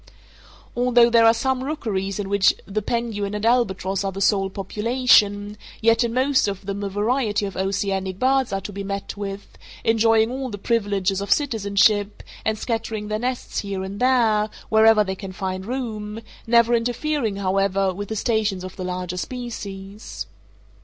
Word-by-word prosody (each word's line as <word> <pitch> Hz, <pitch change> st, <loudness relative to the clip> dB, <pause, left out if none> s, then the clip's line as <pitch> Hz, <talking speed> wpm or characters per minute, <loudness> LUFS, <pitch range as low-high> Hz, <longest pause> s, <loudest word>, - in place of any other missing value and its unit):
Although 240 Hz, -1 st, +4 dB
there 230 Hz, -1 st, +6 dB
are -, -, +8 dB
some 255 Hz, +3 st, -1 dB
rookeries 205 Hz, -10 st, -3 dB
in 205 Hz, -2 st, -3 dB
which 200 Hz, 0 st, +3 dB
the 205 Hz, +2 st, -2 dB
penguin 210 Hz, -2 st, -2 dB
and 210 Hz, +1 st, -3 dB
albatross 195 Hz, -5 st, +1 dB
are 195 Hz, -, -1 dB
the 195 Hz, -, -7 dB
sole 195 Hz, -1 st, +2 dB
population, 210 Hz, 0 st, +2 dB, 0.2 s
yet 230 Hz, +2 st, +3 dB
in 235 Hz, -, -1 dB
most 260 Hz, 0 st, +2 dB
of 195 Hz, -1 st, -5 dB
them 200 Hz, +1 st, -4 dB
a 200 Hz, -, -2 dB
variety 210 Hz, +1 st, 0 dB
of 195 Hz, -, -6 dB
oceanic 190 Hz, -1 st, -1 dB
birds 265 Hz, +1 st, +2 dB
are 195 Hz, 0 st, -2 dB
to 205 Hz, -, -7 dB
be 200 Hz, +1 st, -5 dB
met 200 Hz, 0 st, -4 dB
with, 200 Hz, -1 st, -7 dB, 0.2 s
enjoying 225 Hz, 0 st, +3 dB
all 260 Hz, 0 st, -4 dB
the 205 Hz, -, -6 dB
privileges 200 Hz, -3 st, 0 dB
of 200 Hz, -, -4 dB
citizenship, 205 Hz, -5 st, +2 dB, 0.2 s
and 220 Hz, 0 st, 0 dB
scattering 225 Hz, -2 st, -3 dB
their 215 Hz, 0 st, -1 dB
nests 250 Hz, +1 st, -3 dB
here 195 Hz, -2 st, -4 dB
and 195 Hz, +1 st, -6 dB
there, 230 Hz, -4 st, +3 dB, 0.2 s
wherever 220 Hz, 0 st, +6 dB
they 190 Hz, -1 st, -3 dB
can 190 Hz, -1 st, -8 dB
find 190 Hz, 0 st, -4 dB
room, 225 Hz, -4 st, -4 dB, 0.3 s
never 235 Hz, 0 st, +4 dB
interfering, 240 Hz, 0 st, 0 dB
however, 195 Hz, 0 st, +1 dB
with 205 Hz, +2 st, -6 dB
the 220 Hz, -, -3 dB
stations 215 Hz, -4 st, 0 dB
of 185 Hz, 0 st, -8 dB
the 185 Hz, -, -4 dB
larger 180 Hz, 0 st, -4 dB
species. 205 Hz, -3 st, -6 dB
210 Hz, 165 wpm, -23 LUFS, 195-235 Hz, 0.3 s, are